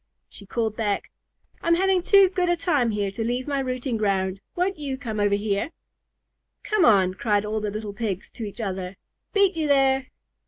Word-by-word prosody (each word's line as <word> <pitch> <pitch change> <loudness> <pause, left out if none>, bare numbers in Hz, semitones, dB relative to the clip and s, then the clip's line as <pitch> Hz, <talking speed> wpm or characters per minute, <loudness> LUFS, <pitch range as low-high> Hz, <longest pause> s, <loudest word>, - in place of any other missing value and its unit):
She 200 - -13
called 220 0 -1
back, 210 -3 -2 0.5
"I'm 335 0 +3
having 380 +1 +2
too 395 +2 +6
good 360 -1 0
a 350 - +2
time 295 -9 +1
here 205 -2 -1
to 225 +3 -4
leave 245 +3 -2
my 280 -1 0
rooting 255 -2 -2
ground. 195 -2 0
Won't 360 -1 0
you 275 -3 -3
come 225 -6 -4
over 205 0 +3
here?" 205 +4 -1 0.9
"Come 425 -5 +2
on," 190 -5 +5
cried 205 +1 0
all 215 +1 -1
the 210 - -2
little 210 0 -5
Pigs 200 -3 -4
to 235 - -7
each 205 +1 -7
other. 190 -3 -4 0.4
"Beat 400 -3 +3
you 315 -2 -1
there!" 270 -2 +3
230 Hz, 190 wpm, -24 LUFS, 205-300 Hz, 0.9 s, too